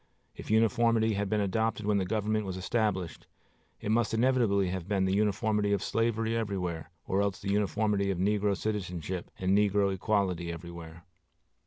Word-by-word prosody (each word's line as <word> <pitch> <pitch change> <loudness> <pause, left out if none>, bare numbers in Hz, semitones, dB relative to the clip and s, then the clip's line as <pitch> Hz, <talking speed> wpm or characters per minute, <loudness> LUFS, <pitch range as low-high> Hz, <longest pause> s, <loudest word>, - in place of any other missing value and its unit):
If - - -10
uniformity 115 0 +3
had 100 -1 -2
been 105 -1 +1
adopted 110 +2 -1
when 105 -1 +2
the 95 - -1
government 110 +1 0
was 95 -1 -4
established, 95 -3 -2 0.5
it 105 - -2
must 115 0 +1
inevitably 115 -6 +2
have 90 -1 -4
been 95 -2 +1
the 95 - +1
uniformity 105 0 +1
of 100 - 0
slavery 115 0 0
everywhere, 90 -8 -3 0.2
or 95 +1 +1
else 100 +1 -1
the 100 -1 -3
uniformity 105 -1 +1
of 95 - -1
negro 100 +1 +1
citizenship 90 -4 -4
and 95 +1 +1
negro 100 -1 +3
equality 95 -3 0
everywhere. 85 0 -9
100 Hz, 160 wpm, -29 LUFS, 95-110 Hz, 0.5 s, uniformity